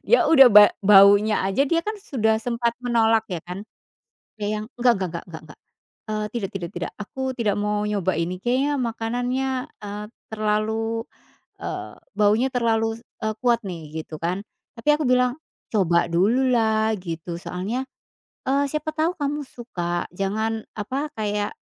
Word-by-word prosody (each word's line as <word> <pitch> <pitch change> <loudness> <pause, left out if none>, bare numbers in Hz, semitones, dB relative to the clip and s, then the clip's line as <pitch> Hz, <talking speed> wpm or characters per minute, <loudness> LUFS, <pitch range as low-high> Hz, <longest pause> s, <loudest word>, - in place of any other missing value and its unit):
dia - - +5
udah 270 -5 +9
ba 205 0 +9
baunya 200 +1 +6
aja 195 +8 +2
dia 335 +4 +2
kan 430 +3 -3
sudah 220 - 0
sempat 235 -1 -1
menolak 225 -2 +3
ya 175 -3 -3
kan, 180 +3 -6 0.8
dia 210 +1 -1
yang 215 - -5
"nggak 245 0 +4
nggak 185 - -1
nggak 170 - -5
nggak 160 -1 -8
nggak," - - -14 0.5
eee, 215 0 -1
"tidak 205 -5 -2
tidak 175 -3 -4
tidak 175 - -4
aku 260 +5 -4
tidak 215 -5 0
mau 210 0 0
nyoba 200 -3 0
ini 175 +2 -2
kayaknya 270 +4 +1
makanannya," 245 +3 -1 0.3
eee, 205 +1 -5 0.3
"terlalu," 220 +1 -1 0.6
eee, - - -5 0.2
"baunya 215 +5 +3
terlalu" 225 -2 +1
se 230 - -27 0.2
eee, 220 0 -1
"kuat 240 -2 +3
nih" 160 -3 -6
gitu 155 - -8
kan 180 +4 -2 0.4
tapi 230 - -5
aku 305 - -2
bilang, 250 0 +3 0.4
"coba 175 -5 +3
dululah" 220 +2 +2
gitu 170 -1 -5
soalnya, 210 +11 -3 0.6
eee, 280 +2 +2
"siapa 305 0 -2
tau 320 +3 +1
kamu 290 0 -2
suka 175 -9 -4
jangan" 220 +3 -2
apa 265 +8 -3
kayak, 210 -1 -1
220 Hz, 155 wpm, -23 LUFS, 200-245 Hz, 0.8 s, udah